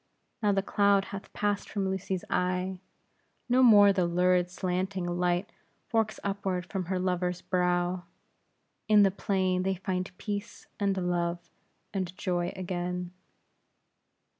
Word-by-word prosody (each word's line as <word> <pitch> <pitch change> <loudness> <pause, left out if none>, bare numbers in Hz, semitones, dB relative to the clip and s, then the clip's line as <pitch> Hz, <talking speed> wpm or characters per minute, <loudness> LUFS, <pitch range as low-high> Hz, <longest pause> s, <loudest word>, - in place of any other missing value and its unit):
Now 210 -2 +3
the 195 -1 +1
cloud 200 -1 +3
hath 195 - -7
passed 205 -1 -1
from 195 -2 -1
Lucy's 190 -1 -2
eye; 180 +1 -1 0.7
no 250 +1 +4
more 205 -5 +8
the 185 -3 +1
lurid 180 +1 +2
slanting 185 +1 -2
light 175 +2 0 0.4
forks 220 -2 0
upward 195 -2 -2
from 190 -1 -3
her 185 +2 -1
lover's 180 -1 -1
brow. 180 0 0 0.8
In 210 -1 +6
the 195 - +4
plain 185 -2 0
they 190 +1 0
find 185 0 -3
peace, 205 +1 -5
and 200 -1 +1
love, 175 -1 -1 0.4
and 185 -2 -3
joy 175 -1 -1
again. 180 -1 -3
185 Hz, 130 wpm, -29 LUFS, 180-200 Hz, 0.8 s, more